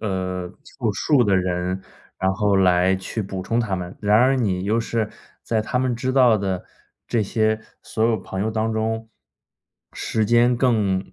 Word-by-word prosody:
呃， 90 -3 -3
凑 120 -8 -3
数 125 +6 +2
的 100 -2 +3
人， 90 0 -1 0.4
然 95 0 +1
后 100 +1 +1
来 90 0 +4
去 95 +4 -4
补 95 -2 -5
充 115 +5 -1
他 105 -5 0
们。 90 0 -6
然 105 0 +3
而 130 +4 +4
你 95 -7 0
又 110 +4 +1
是 115 -1 -1 0.3
在 110 -2 0
他 110 - -3
们 130 -1 0
知 130 +2 -2
道 125 -5 +5
的 95 -2 -2 0.4
这 115 - +1
些 110 +1 +1 0.2
所 110 - -3
有 115 -1 +3
朋 95 -1 -6
友 110 - 0
当 110 0 -1
中， 110 +1 -2 0.8
时 110 -1 -1
间 120 +2 +4
更 105 -7 +1
110 Hz, 190 characters per minute, -22 LUFS, 95-115 Hz, 0.8 s, 道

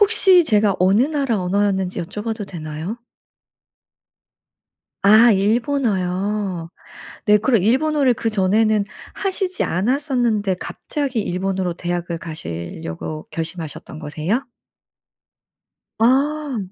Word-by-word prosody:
혹시 385 -4 +6
제가 210 -7 +2
어느 190 +5 +4
나라 275 -6 0
언어였는지 190 0 0
여쭤봐도 210 +4 -4
되나요? 160 +3 -6 2.1
아 220 +4 +7
일본어요. 200 - 0 0.6
네 210 0 +6
그럼 225 -2 +2
일본어를 270 +3 +3
그 225 0 -2
전에는 215 +1 +2 0.3
하시지 380 -1 -2
않았었는데 235 - 0
갑자기 270 -6 -3
일본으로 185 -1 -2
대학을 175 0 -3
가시려고 85 - -6
결심하셨던 160 -2 -6
거세요? 160 - -2 1.5
아. 275 +3 +2
210 Hz, 240 characters per minute, -20 LUFS, 180-250 Hz, 2.1 s, 아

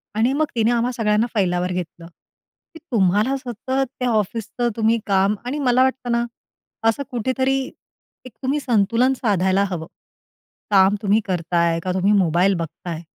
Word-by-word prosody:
आणि 230 +4 +2
मग 310 +2 +1
तिने 225 0 +2
आम्हा 240 +1 +1
सगळ्यांना 215 0 +2
फैलावर 180 -4 0
घेतलं, 175 -1 -5 0.7
की 325 - -11
तुम्हाला 210 +5 +2
सतत 245 -2 -9 0.3
त्या 250 - 0
ऑफिसचं 225 +2 -1
तुम्ही 225 0 +2
काम 195 +1 +2
आणि 275 +4 -3
मला 255 -2 +3
वाटतं 260 -2 -1
ना 235 0 +2 0.7
असं 255 +6 -1
कुठेतरी 260 +3 0 0.7
एक 255 - -10
तुम्ही 275 +3 0
संतुलन 235 0 +2
साधायला 195 -5 +1
हवं. 165 -3 -5 0.8
काम 195 0 +5
तुम्ही 205 0 +3
करताय 170 -2 0
का, 185 +2 -3
तुम्ही 190 +2 +2
मोबाईल 185 0 +3
बघताय? 165 0 -6
215 Hz, 145 wpm, -21 LUFS, 185-245 Hz, 0.8 s, काम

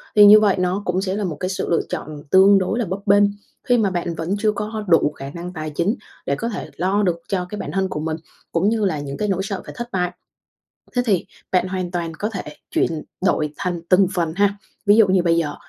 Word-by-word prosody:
thì 210 -1 +9
như 210 +1 +10
vậy 205 -3 +3
nó 180 +2 0
cũng 180 +1 0
sẽ 190 -1 -2
là 210 - -2
một 160 -6 -3
cái 185 - -2
sự 190 - -3
lựa 170 - +3
chọn 150 -1 -6
tương 195 +1 +7
đối 190 +5 -1
là 235 - 0
bấp 190 +2 -3
bênh, 205 0 +5 0.4
khi 245 - +3
mà 215 -4 +2
bạn 175 -2 -3
vẫn 165 +5 -2
chưa 215 0 +2
có 210 - -3
có 215 0 -4
đủ 165 -3 +4
khả 135 -2 -8
năng 175 +4 -7
tài 155 -2 -4
chính 170 +9 0 0.3
để 140 - 0
có 230 +8 -3
thể 215 - -5
lo 190 +4 +1
được 175 -3 0
cho 185 -2 -1
cái 210 - -6
bản 145 - -5
thân 190 +2 0
của 150 - -4
mình, 155 0 -2 0.3
cũng 170 +5 +2
như 220 -2 +1
là 155 -6 0
những 140 -1 -5
cái 210 - -1
nỗi 190 -2 0
sợ 200 -1 -4
phải - - -9
thất 240 0 -5
bại. 180 -2 0 0.9
Thế 245 - +3
thì 195 -6 +1 0.3
bạn 185 0 +2
hoàn 185 -1 -3
toàn 170 -2 -3
có 210 - -1
thể 200 -4 -4 0.3
chuyển 160 -2 0 0.2
đổi 150 -5 +1
thành 175 -2 -2
từng 190 +1 +5
phần 170 -4 0
ha, 200 0 +2 0.3
ví 205 - +6
dụ 220 -2 +7
như 185 -1 +3
bây 170 -1 +3
giờ, 150 -3 0
185 Hz, 260 wpm, -21 LUFS, 170-205 Hz, 0.9 s, như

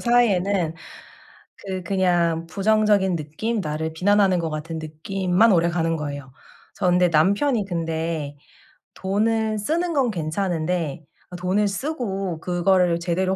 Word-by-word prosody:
사이에는 200 -8 +2 0.8
그 190 -2 -5
그냥 175 -3 +1
부정적인 200 0 +2
느낌, 165 +10 -3
나를 160 0 -3
비난하는 195 +1 +3
것 165 -1 -2
같은 160 +1 -5
느낌만 180 +7 +1
오래가는 170 -2 +2
거예요. 145 -3 -6 0.4
저 - - -1
근데 180 0 +4
남편이 200 - +2
근데 165 -4 -3 0.6
돈을 220 +3 0
쓰는 335 +9 -1
건 265 -5 +2
괜찮은데 165 -2 -2 0.3
아 180 - -9
돈을 185 +4 +1
쓰고 195 - -3
그거를 175 0 +2
제대로 185 +2 0
180 Hz, 270 characters per minute, -23 LUFS, 165-200 Hz, 0.8 s, 근데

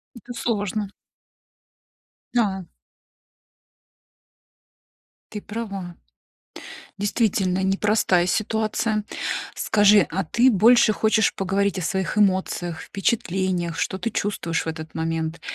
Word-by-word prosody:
Это 245 +2 -10
сложно. 210 -3 -2 1.5
Да. 195 -6 +1 2.7
Ты 210 - -5
права. 200 -5 -6 1.0
Действительно, 200 -3 +1
непростая 195 -2 +2
ситуация. 215 +1 0 0.5
Скажи, 205 -2 +4
а 190 +2 -1
ты 235 +10 +3
больше 225 +1 +5
хочешь 220 0 +2
поговорить 195 +1 0
о - - -3
своих 190 +4 -2
эмоциях, 185 -4 +1
впечатлениях, 185 -5 -1
что 190 - -2
ты 230 +5 -2
чувствуешь 170 -6 -2
в - - -7
этот 160 -1 -6
момент? 160 0 -2
195 Hz, 95 wpm, -23 LUFS, 180-215 Hz, 2.7 s, больше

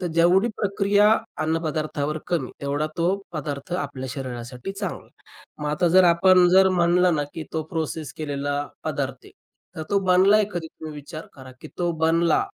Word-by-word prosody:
तर 180 - -2
जेवढी 180 +7 +4
प्रक्रिया 200 0 +3 0.3
अन्नपदार्थावर 155 -1 -2
कमी, 175 -2 -1
तेवढा 145 +2 -1
तो 170 - +1 0.3
पदार्थ 145 0 -5
आपल्या 140 -6 -4
शरीरासाठी 125 +3 -6
चांगला 195 -2 -5
आहे. - - -24 0.5
मग - - -2
आता 150 +4 +1
जर 185 +2 +6
आपण 180 +1 +5
जर 190 +1 +6
म्हणलं 175 +1 +3
ना, 150 - 0
की 160 - -5
तो 160 - -1
प्रोसेस 160 -3 -3
केलेला 145 -2 -3 0.3
पदार्थ - - -3
आहे, - - -14 0.5
तर 160 - -4
तो 200 - +3
बनलाय 195 +4 +5
कधी? 175 -2 -4
तो 155 -1 -6
विचार 150 +2 -9
करा, 130 -2 -12
की 155 - -10
तो 175 -1 +1
बनला, 170 - +3
165 Hz, 165 wpm, -24 LUFS, 145-180 Hz, 0.5 s, जर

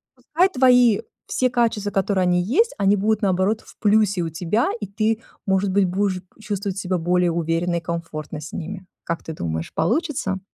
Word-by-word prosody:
Пускай 360 +5 +1
твои 250 - +5 0.3
все 255 - +1
качества, 230 -4 0
которые 195 -1 +1
они 180 0 +2
есть, 295 - +2
они 200 0 +3
будут 215 +2 +1
наоборот 195 +2 +1
в - - -18
плюсе 210 -3 +3
у 165 - -2
тебя, 180 +8 0
и 205 - -4
ты, 215 +3 0 0.3
может 190 0 +2
быть, 195 0 +3
будешь 185 0 -1 0.2
чувствовать 200 -2 -3
себя 185 -1 -1
более 175 +1 +2
уверенно 165 +1 0
и 170 - -1
комфортно 165 -2 -5
с 150 - -8
ними. 190 +2 -6 0.2
Как 170 -1 -3
ты 160 - -6
думаешь, 80 - -4
получится? 220 - 0
195 Hz, 175 wpm, -22 LUFS, 175-215 Hz, 0.3 s, твои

